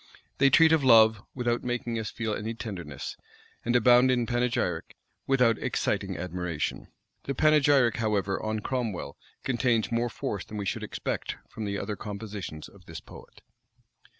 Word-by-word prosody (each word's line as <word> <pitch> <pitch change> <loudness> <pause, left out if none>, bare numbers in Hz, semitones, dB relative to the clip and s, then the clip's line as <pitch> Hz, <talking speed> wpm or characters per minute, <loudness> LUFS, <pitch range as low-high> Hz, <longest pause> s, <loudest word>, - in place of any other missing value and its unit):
They 140 0 +6
treat 160 +3 +6
of 160 -3 +3
love, 110 -4 +6
without 120 -2 -1
making 120 -2 -2
us 110 - -3
feel 110 -2 -3
any 110 +2 -4
tenderness; 90 - -6 0.5
and 120 +1 0
abound 125 +2 +6
in 125 -2 +2
panegyric, 120 -8 -1 0.3
without 125 -4 +3
exciting - - -1
admiration. 90 -3 -3 0.4
The 140 - -2
panegyric, 145 -5 +4
however, 105 -3 0
on 110 0 -2
Cromwell, 110 - -3 0.3
contains 120 -3 +1
more 120 +1 +1
force 105 -3 -4
than 105 - -8
we 100 - -3
should - - -2
expect, - - -4
from 110 - -6
the 100 -1 -2
other 105 - -3
compositions 100 -6 -7
of - - -19
this - - -7
poet. - - -15
115 Hz, 150 wpm, -28 LUFS, 100-125 Hz, 0.5 s, They